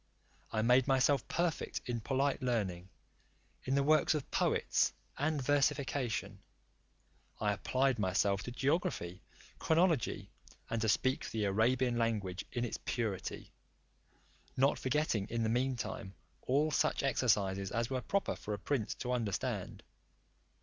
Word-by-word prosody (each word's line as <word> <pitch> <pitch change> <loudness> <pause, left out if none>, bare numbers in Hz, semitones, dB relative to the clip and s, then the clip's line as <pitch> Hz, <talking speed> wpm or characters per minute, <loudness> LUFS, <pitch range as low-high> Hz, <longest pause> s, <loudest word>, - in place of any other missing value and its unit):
I 110 - 0
made 125 +3 +4
myself 135 -1 +3
perfect 170 -2 -1
in 120 -3 -2
polite 135 +4 0
learning, 95 -8 -1 0.8
in 135 - +1
the 140 - +3
works 155 +2 +4
of 150 - -4
poets, - - +2 0.3
and 150 +1 +1
versification. 140 -2 0 1.0
I 105 -1 +1
applied 130 +4 +1
myself 100 0 +1
to 125 - -5
geography, 125 - -1 0.4
chronology, 165 - +2 0.4
and 115 -1 0
to 110 - +1
speak 130 +6 +1
the 110 -2 -1
Arabian 120 +4 +2
language 105 -5 -1
in 120 -1 -1
its 120 - -4
purity; 110 -6 -3 1.1
not 135 +3 +3
forgetting 130 -7 0
in 115 0 -1
the 110 - +1
meantime 115 -5 -2 0.3
all 145 +4 +2
such - - +1
exercises 100 -7 +1
as 115 +3 -2
were 130 -1 -1
proper 200 +7 -1
for 105 - -4
a - - -8
prince 115 +1 -2
to 125 - -4
understand. 115 -6 -2
125 Hz, 130 wpm, -34 LUFS, 105-140 Hz, 1.1 s, made